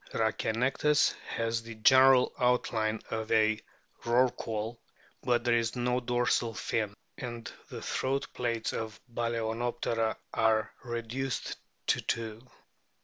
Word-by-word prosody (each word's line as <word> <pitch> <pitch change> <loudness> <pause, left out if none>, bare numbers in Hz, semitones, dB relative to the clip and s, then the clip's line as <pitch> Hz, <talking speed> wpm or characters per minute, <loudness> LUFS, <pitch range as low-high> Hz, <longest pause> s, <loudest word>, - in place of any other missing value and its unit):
Rhachianectes 115 +6 +2
has 115 0 -1
the 115 0 -9
general 130 +3 +6
outline 115 -3 +1
of 110 -1 -3
a 110 -1 +4 0.4
Rorqual; 120 -2 0 0.4
but 120 -1 +1
there 120 -1 +3
is 115 0 +1
no 125 0 +1
dorsal 120 -2 +1
fin, 105 -2 -1 0.2
and 120 -2 -6 0.2
the - - -7
throat 135 +1 -1
plaits 115 -2 -1
of 110 -1 -4
Baltznoptera 115 0 -1 0.2
are 110 -1 +2
reduced 120 +1 -3 0.3
to - - +2
two. 110 -1 -3
115 Hz, 110 wpm, -30 LUFS, 110-125 Hz, 0.4 s, general